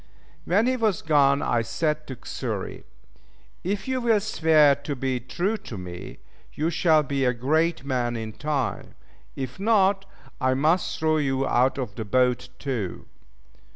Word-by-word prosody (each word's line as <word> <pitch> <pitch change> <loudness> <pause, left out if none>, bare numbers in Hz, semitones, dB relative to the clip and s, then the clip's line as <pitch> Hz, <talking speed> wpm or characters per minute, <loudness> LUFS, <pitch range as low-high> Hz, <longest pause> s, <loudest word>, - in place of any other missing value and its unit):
When 200 +8 +3
he 255 +1 +1
was 215 -6 0
gone 140 -3 +3
I 120 - +1
said 150 +7 -2
to 130 - -7
Xury, - - -4 0.8
"If 195 +4 -2
you 260 -1 -1
will 230 -3 +3
swear 160 -8 +4
to 145 +1 -5
be 130 -1 -1
true 175 - -2
to 115 - -9
me, 90 -1 -8 0.4
you 160 +3 0
shall 160 -2 +3
be 140 -1 -1
a 125 -1 +2
great 155 +5 +1
man 125 -3 -1
in 110 -1 -5
time; 145 -3 -3 0.4
if 130 +2 -5
not, 195 -2 +3 0.4
I 130 0 +2
must 155 +6 +1
throw 155 0 +2
you 135 -2 0
out 125 +2 +2
of 125 -7 -4
the 110 - -5
boat 125 +3 +1
too." 120 -10 -4
145 Hz, 155 wpm, -25 LUFS, 125-170 Hz, 0.8 s, swear